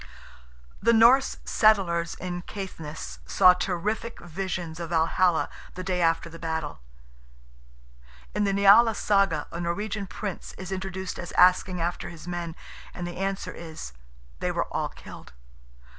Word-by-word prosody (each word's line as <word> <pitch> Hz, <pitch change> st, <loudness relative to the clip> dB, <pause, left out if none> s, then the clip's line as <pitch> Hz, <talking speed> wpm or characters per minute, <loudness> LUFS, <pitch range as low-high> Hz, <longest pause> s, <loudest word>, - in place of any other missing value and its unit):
The 235 Hz, -, +4 dB
Norse 245 Hz, +4 st, +5 dB
settlers 180 Hz, -6 st, +3 dB
in 175 Hz, -1 st, -5 dB
Caithness 170 Hz, -6 st, -7 dB
saw 180 Hz, -, +7 dB
terrific 195 Hz, +6 st, -2 dB
visions 175 Hz, -1 st, -5 dB
of 170 Hz, -1 st, -5 dB
Valhalla 170 Hz, +1 st, +2 dB, 0.3 s
"the 185 Hz, -, -5 dB
day 180 Hz, -1 st, -1 dB
after 165 Hz, 0 st, +2 dB
the 165 Hz, 0 st, -11 dB
battle." 160 Hz, -, -3 dB, 1.5 s
In 210 Hz, -, +1 dB
the 200 Hz, -, +2 dB
NIALA 200 Hz, +3 st, +6 dB
SAGA 195 Hz, -9 st, +2 dB
a 170 Hz, -, -5 dB
Norwegian 200 Hz, +4 st, -2 dB
prince 200 Hz, -1 st, -6 dB
is 190 Hz, 0 st, -8 dB
introduced 190 Hz, 0 st, -4 dB
as 175 Hz, -, -6 dB
asking 180 Hz, 0 st, +4 dB
after 170 Hz, +1 st, -2 dB
his 165 Hz, 0 st, -11 dB
men, 175 Hz, -2 st, -4 dB, 0.4 s
and 175 Hz, -, -4 dB
the 175 Hz, 0 st, -6 dB
answer 195 Hz, +1 st, -2 dB
is, 160 Hz, -, -8 dB, 0.5 s
"they -, -, -1 dB
were -, -, -1 dB
all -, -, -1 dB
killed." -, -, -12 dB
180 Hz, 140 wpm, -26 LUFS, 170-195 Hz, 1.5 s, saw